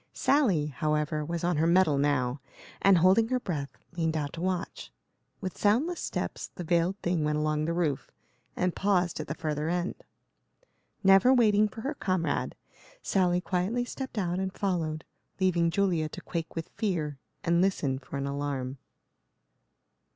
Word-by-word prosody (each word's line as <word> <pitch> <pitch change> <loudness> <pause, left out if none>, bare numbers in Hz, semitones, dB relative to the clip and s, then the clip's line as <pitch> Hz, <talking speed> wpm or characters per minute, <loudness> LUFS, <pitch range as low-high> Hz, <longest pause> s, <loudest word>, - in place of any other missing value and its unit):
Sally, 220 - +3
however, 150 +2 -1
was 170 +2 -4
on 175 -2 +1
her 160 +2 +3
mettle 170 -5 +4
now, 140 -2 +1 0.4
and, 195 -2 +6
holding 190 +6 +5
her 255 +1 0
breath, 150 - -3 0.3
leaned 160 -2 0
out 145 -2 -3
to 165 - -6
watch. 180 - -3 0.5
With 185 - -4
soundless 265 +13 +2
steps - - -4
the 180 - -5
veiled 175 +3 +1
thing 175 -3 +1
went 150 0 +1
along 155 0 0
the 165 - -1
roof, 160 -6 -1 0.5
and 180 -1 0
paused 185 -4 +1
at - - -4
the 155 - -3
further 155 -1 -2
end. 175 +1 -1 1.1
Never 195 +6 +6
waiting 215 -4 +5
for 220 +2 -9
her 275 +6 -2
comrade, 185 - -1 0.5
Sally 180 -2 +2
quietly 195 +8 -1
stepped 260 -1 -6
out 180 -2 0
and 190 0 -2
followed, 165 -6 -2 0.3
leaving 175 -3 +3
Julia 170 -4 +1
to - - -8
quake 165 -2 -5
with 165 -1 -4
fear 155 -9 -2 0.2
and 170 +1 +3
listen 145 -9 +1
for 140 +1 -7
an 140 - -2
alarm. 140 -2 -3
170 Hz, 160 wpm, -29 LUFS, 150-190 Hz, 1.1 s, and